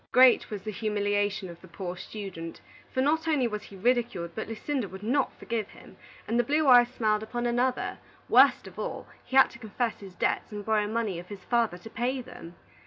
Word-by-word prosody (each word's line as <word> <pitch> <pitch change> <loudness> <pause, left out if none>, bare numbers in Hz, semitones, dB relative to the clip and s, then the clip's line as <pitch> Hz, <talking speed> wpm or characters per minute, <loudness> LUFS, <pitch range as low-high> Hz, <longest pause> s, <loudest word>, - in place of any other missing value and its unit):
Great 255 0 +6
was 205 -3 -5
the 215 - -4
humiliation 205 -1 0
of 170 -1 -11
the 185 - -13
poor 180 +1 -6
student; 180 -4 -7 0.3
for 260 - 0
not 320 +4 +1
only 290 -6 +2
was 210 -2 -4
he 200 - -13
ridiculed, 225 -5 0
but 220 - -4
Lucinda 230 0 -3
would 190 +3 -9
not 260 +5 +1
forgive 225 -3 -3
him, - - -15 0.3
and 235 +2 +1
the - - +4
blue 300 +4 +1
eyes 245 -2 +8
smiled 215 -4 0
upon 240 +2 -3
another; 245 +2 0 0.3
worst - - +6
of - - -11
all, - - -4 0.2
he 265 - -6
had 265 - +7
to 235 - -13
confess 225 +1 -2
his 195 -3 -11
debts - - 0
and 205 -1 -6
borrow 215 -1 +2
money 215 -5 -1
of 175 - -10
his 200 -2 -9
father 235 -7 +1
to 200 +5 -11
pay 255 +3 -1
them. 175 -8 -10
220 Hz, 210 wpm, -28 LUFS, 200-245 Hz, 0.3 s, eyes